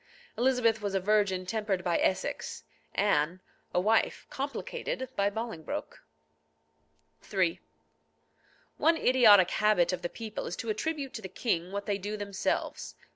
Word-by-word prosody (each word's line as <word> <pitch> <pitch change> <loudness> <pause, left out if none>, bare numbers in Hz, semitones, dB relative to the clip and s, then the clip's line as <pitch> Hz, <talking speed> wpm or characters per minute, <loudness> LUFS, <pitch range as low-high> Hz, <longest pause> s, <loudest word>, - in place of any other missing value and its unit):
Elizabeth 240 -3 +2
was 200 -1 -2
a - - +3
virgin 195 -2 +2
tempered 205 -2 -1
by 175 -2 +1
Essex; 185 - -1 0.3
Anne, 180 -3 +2 0.3
a - - +2
wife 220 +4 +2
complicated 275 - -4
by 200 0 +2
Bolingbroke. 220 -6 -5 1.3
III. 185 -4 +1 1.2
One 325 +1 +4
idiotic 215 - +6
habit 210 -4 +3
of 180 - -3
the 175 - -3
people 220 0 -6
is 175 - -4
to 230 - -5
attribute 280 +4 -3
to 220 - -6
the 190 - -7
king 180 -3 -1
what 200 0 -4
they 200 -1 -1
do 205 +2 -4
themselves. 200 -1 -2
205 Hz, 135 wpm, -30 LUFS, 185-225 Hz, 1.3 s, idiotic